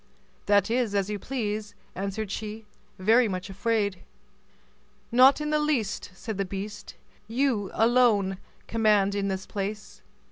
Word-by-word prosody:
"That 200 +1 +3
is 235 -4 +1
as 200 +1 0
you 205 - -3
please," 210 -4 -3 0.2
answered 195 +2 -4
she, 215 +1 -5 0.3
very 225 +6 +4
much 190 0 -4
afraid. 200 -1 0 1.1
"Not 255 +4 +6
in 300 0 -2
the 305 - +3
least," 275 -12 -1
said 215 0 -6
the - - +2
beast; 200 +2 -7 0.3
"you 230 -4 0
alone 220 -5 +3 0.3
command 210 -3 +2
in 200 -1 -1
this 190 -1 -3
place. 205 +1 -5
210 Hz, 135 wpm, -27 LUFS, 200-230 Hz, 1.1 s, Not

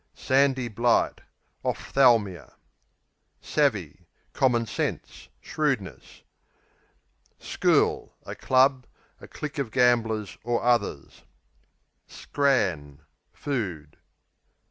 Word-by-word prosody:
Sandy 130 -2 +1
blight 120 +2 +1 0.4
Ophthalmia. 115 -9 +1 0.8
Savvy 100 - -1 0.3
Common 120 -3 +2
sense; 110 - -5
shrewdness. 140 - -4 1.1
School - - 0
A - - -6
club; 130 0 +2 0.3
a - - -12
clique 150 0 -7
of 135 -5 -2
gamblers, 115 -4 +1
or 120 +1 -1
others. 120 - -1 0.9
Scran 90 - -1 0.3
Food. 90 - -5
120 Hz, 75 wpm, -25 LUFS, 100-135 Hz, 1.1 s, Common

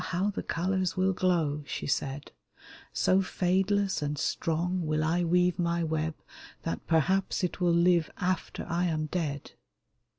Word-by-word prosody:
how 185 +4 0
the - - -4
colors 185 +2 -1
will 190 +1 +2
glow! 165 -6 +1
" - - -24
she - - -4
said; 140 0 -2 0.3
" - - -20 0.3
So 190 +1 +3
fadeless 190 +1 +1
and 145 0 -2
strong 170 +4 -1
will 155 0 +1
I 170 +3 +1
weave 180 +1 +2
my 170 0 +1
web 160 0 -1 0.5
That 85 - -4
perhaps 185 +5 +1
it 180 0 -2
will 175 - +3
live 170 -1 +3
after 185 -1 -2
I 175 +1 0
am 155 -3 0
dead." 150 -4 -3
175 Hz, 160 wpm, -29 LUFS, 160-185 Hz, 0.5 s, So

